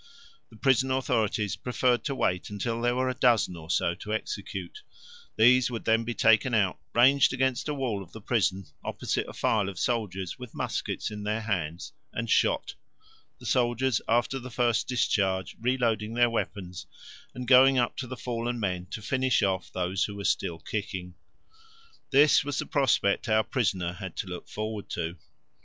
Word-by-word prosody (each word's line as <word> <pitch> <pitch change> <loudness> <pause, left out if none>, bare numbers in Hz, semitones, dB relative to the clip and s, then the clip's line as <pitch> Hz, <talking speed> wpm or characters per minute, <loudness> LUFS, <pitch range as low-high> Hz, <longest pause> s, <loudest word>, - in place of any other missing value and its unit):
The 115 - -16
prison 130 +2 +2
authorities 115 -5 0
preferred 125 0 0
to 140 - -1
wait 90 -8 -1
until 115 +3 -3
there 120 0 +1
were 130 +1 +1
a 130 - 0
dozen 120 -8 +2
or 80 -1 -11
so 85 -1 +1
to 105 +4 -8
execute; 425 - -5 0.5
these 125 +2 +5
would 115 -2 -5
then 115 0 +3
be 120 0 -3
taken 115 +2 +4
out, 95 -8 +1 0.2
ranged 130 +3 +5
against 130 +2 0
a - - 0
wall 120 -7 -2
of 90 -2 -12
the 110 - -9
prison, 100 -4 0 0.2
opposite - - -2
a - - -9
file 105 -4 +1
of 95 - -9
soldiers 95 -7 -2
with 125 -2 -10
muskets - - -3
in 105 -1 -6
their 105 +2 -1
hands, 90 -6 -3 0.2
and - - -3
shot, - - +2 0.6
the - - -14
soldiers 120 -1 +1
after 120 +3 +1
the 130 0 -8
first 120 -1 +1
discharge 95 -7 0
reloading 115 -3 0
their 120 -1 +4
weapons 95 -5 -4 0.5
and 125 -1 -6
going 130 +1 +7
up 120 -2 +1
to 130 - -4
the 130 +1 -7
fallen 120 0 -3
men 90 -4 -2
to 105 - -7
finish 130 +1 +1
off 95 -2 -1
those 90 +1 -1
who 100 - -6
were 100 - -6
still 85 - 0
kicking. 95 -1 -5 1.0
This 145 +2 +5
was 145 -1 -3
the - - -1
prospect 120 -8 +1
our 110 0 +4
prisoner 95 -9 -1
had 90 -1 -8
to - - -4
look 90 -1 -7
forward 110 -1 -5
to. 85 +2 -3
115 Hz, 175 wpm, -28 LUFS, 95-125 Hz, 1.0 s, going